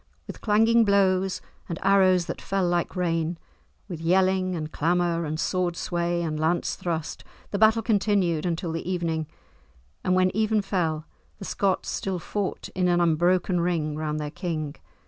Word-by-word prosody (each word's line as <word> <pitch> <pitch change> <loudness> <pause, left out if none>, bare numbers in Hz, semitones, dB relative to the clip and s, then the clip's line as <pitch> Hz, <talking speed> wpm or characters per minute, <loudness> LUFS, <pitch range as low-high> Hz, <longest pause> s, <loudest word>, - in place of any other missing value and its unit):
With - - -9
clanging 225 +2 +4
blows 190 -2 +2 0.3
and 170 - -3
arrows 190 -2 +4
that - - -6
fell 195 -1 0
like 175 +1 -1
rain, 165 -2 -1 0.5
with 170 -5 -6
yelling 185 +1 +2
and 155 -2 -4
clamour 170 +1 +1
and 155 +1 -3
sword 180 -1 0
sway 175 0 -1
and 155 -2 -2
lance 160 +3 0
thrust, 165 -3 -4 0.3
the 200 - -1
battle 220 +1 +5
continued 200 -7 +1
until 170 -1 -2
the 165 +2 -4
evening, 165 -3 -1 0.8
and 185 - +2
when 185 0 +2
even 215 -1 +2
fell, 165 -5 -1 0.3
the 195 - -8
Scots 195 -1 0
still 190 -2 -2
fought 195 +3 -4
in 180 -1 0
an 175 0 +3
unbroken 175 +2 +2
ring 165 -3 0
round 155 0 -2
their 150 -1 -4
king. 160 -4 -4
175 Hz, 160 wpm, -25 LUFS, 165-190 Hz, 0.8 s, battle